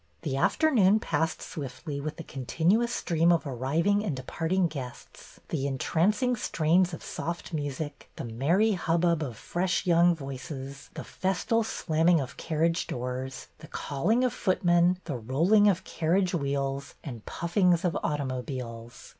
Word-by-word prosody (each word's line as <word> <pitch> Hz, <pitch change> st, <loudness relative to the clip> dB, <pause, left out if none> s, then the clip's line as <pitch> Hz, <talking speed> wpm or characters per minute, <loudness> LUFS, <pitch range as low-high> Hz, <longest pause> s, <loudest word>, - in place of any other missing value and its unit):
The 145 Hz, -5 st, -2 dB
afternoon 215 Hz, -, +4 dB
passed 160 Hz, -3 st, -1 dB
swiftly 140 Hz, +1 st, -6 dB
with 155 Hz, +1 st, -5 dB
the 165 Hz, -, -6 dB
continu 165 Hz, -, +1 dB
ous 235 Hz, -, -2 dB
stream 170 Hz, -7 st, +2 dB
of 170 Hz, -2 st, +2 dB
arriving 155 Hz, -, +1 dB
and 170 Hz, -10 st, -2 dB
departing 165 Hz, +8 st, 0 dB
guests, 135 Hz, -7 st, -8 dB
the 140 Hz, -3 st, -1 dB
entrancing 200 Hz, -, +1 dB
strains 175 Hz, -3 st, +2 dB
of 165 Hz, -, -7 dB
soft 170 Hz, +1 st, -5 dB
music, 145 Hz, 0 st, -4 dB
the -, -, -6 dB
merry 150 Hz, -, +2 dB
hub 170 Hz, -3 st, 0 dB
bub 170 Hz, -2 st, +2 dB
of 125 Hz, -7 st, -4 dB
fresh 180 Hz, +3 st, -1 dB
young 175 Hz, 0 st, +5 dB
voices, 135 Hz, -1 st, -7 dB
the -, -, -5 dB
festal 195 Hz, +5 st, 0 dB
slamming 165 Hz, -4 st, +2 dB
of 135 Hz, -3 st, -5 dB
carriage 165 Hz, +1 st, 0 dB
doors, 125 Hz, +1 st, -5 dB
the -, -, -11 dB
calling 215 Hz, -, 0 dB
of 250 Hz, -, +1 dB
footmen, 175 Hz, -1 st, +3 dB
the 145 Hz, -6 st, -3 dB
rolling 165 Hz, -, +3 dB
of 195 Hz, -4 st, +2 dB
carriage 180 Hz, +3 st, 0 dB
wheels, 140 Hz, -3 st, -2 dB
and 120 Hz, -7 st, -7 dB
puffings 175 Hz, 0 st, +2 dB
of 175 Hz, -, +1 dB
automobiles. 125 Hz, -5 st, -4 dB
160 Hz, 145 wpm, -28 LUFS, 135-180 Hz, -, young